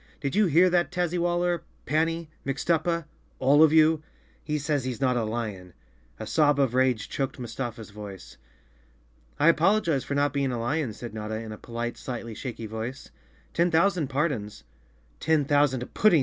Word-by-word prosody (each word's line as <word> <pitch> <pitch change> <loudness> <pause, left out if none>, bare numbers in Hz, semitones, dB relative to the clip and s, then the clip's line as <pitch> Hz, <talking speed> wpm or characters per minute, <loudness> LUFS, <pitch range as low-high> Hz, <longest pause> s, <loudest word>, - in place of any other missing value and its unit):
Did 140 +4 -2
you 210 -1 +4
hear 170 +3 +5
that, 175 0 +2
Tazzywaller, 175 -1 0 0.2
Panny, 165 +2 0 0.2
Mixtuppa—all 155 -1 0
of 160 -1 +7
you? 160 0 +5 0.4
He 150 -1 -1
says 145 -2 -1
he's 125 -2 -4
not 130 -2 +2
a 120 - +1
lion." 105 -6 -4 0.4
A 110 - -5
sob 145 +3 +3
of 135 -4 +2
rage 125 -4 +2
choked 135 -2 -3
Mustafa's 120 -2 -6
voice. 95 - -10 1.0
"I 150 - +4
apologize 165 -3 +3
for 140 - -3
not 145 -1 +2
being 140 -2 0
a 120 - -2
lion," 130 +2 -1
said 120 +1 -8
Notta, 110 0 -4
in 110 0 -6
a 105 - -7
polite, 120 0 -4
slightly 115 -3 -5
shaky 115 -1 -6
voice. 110 +4 -6 0.4
"Ten 170 +1 +2
thousand 170 -1 +2
pardons!" 135 -7 -2 0.6
"Ten 155 -3 +2
thousand 140 -3 +1
puddings!" 205 -7 +5
140 Hz, 160 wpm, -27 LUFS, 115-160 Hz, 1.0 s, of